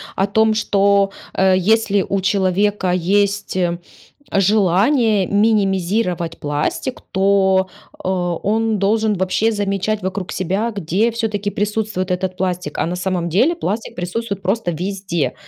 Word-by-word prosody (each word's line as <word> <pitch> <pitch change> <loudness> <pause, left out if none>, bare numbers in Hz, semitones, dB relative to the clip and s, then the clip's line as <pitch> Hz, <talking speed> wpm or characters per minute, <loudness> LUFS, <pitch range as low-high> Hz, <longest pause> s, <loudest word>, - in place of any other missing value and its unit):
о 195 - +1
том, 220 +2 +3
что, 200 -2 +2 0.2
э, 190 -1 +3
если 205 +1 +2
у 195 - 0
человека 190 0 +1
есть 200 +3 0 0.8
желание 205 - +3
минимизировать 195 -4 +1
пластик, 150 - -2
то, 190 -1 +3 0.4
а, 185 - -1 0.3
он 220 +1 +1
должен 215 +2 +2
вообще 190 +5 +1
замечать 205 0 -1
вокруг 190 0 -4
себя, 210 +7 -1
где 200 +4 0
всё-таки 215 -3 -2
присутствует 205 -2 -2
этот 185 0 -2
пластик, 180 -5 -3
а - - 0
на 175 +2 -3
самом 180 -1 -2
деле 245 - +2
пластик 225 - -4
присутствует 200 +3 -4
просто 190 -1 -1
везде. 185 -1 -2
195 Hz, 125 wpm, -19 LUFS, 185-215 Hz, 0.8 s, том